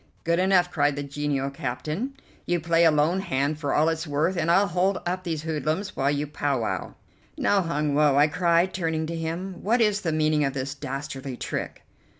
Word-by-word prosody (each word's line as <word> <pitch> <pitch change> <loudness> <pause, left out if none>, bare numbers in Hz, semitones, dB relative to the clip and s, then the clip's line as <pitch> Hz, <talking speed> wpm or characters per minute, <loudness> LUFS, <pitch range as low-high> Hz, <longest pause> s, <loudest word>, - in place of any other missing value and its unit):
"Good 170 +1 +1
enough," 185 -1 +3
cried 145 -4 +2
the 145 - -3
genial 140 -1 -2
captain, 155 - -4 0.3
"you 175 0 +1
play 170 +1 +3
a - - +7
lone 155 +4 +2
hand 150 -5 -1
for 145 -2 -2
all 155 - +3
it's 160 0 -1
worth, 155 +6 0
and 170 -1 0
I'll 190 +4 +5
hold 185 +1 +1
up 185 +1 -2
these 160 -4 -3
hoodlums 160 +5 -2
while 135 +1 +1
you 145 +1 0
pow 145 -2 -1
wow." 110 - -3 0.4
"Now, 200 -1 +2
Hun 150 -4 -1
Woe," 145 -1 +4
I 145 - +7
cried, 170 +3 +2
turning 160 -3 -1
to 165 +1 -4
him, 170 +3 -4
"what 230 +5 +2
is 210 -3 +2
the 165 - -1
meaning 155 -1 +2
of 135 -1 -1
this 135 +1 -3
dastardly 135 -1 -6
trick?" - - -5
160 Hz, 200 wpm, -25 LUFS, 145-180 Hz, 0.4 s, a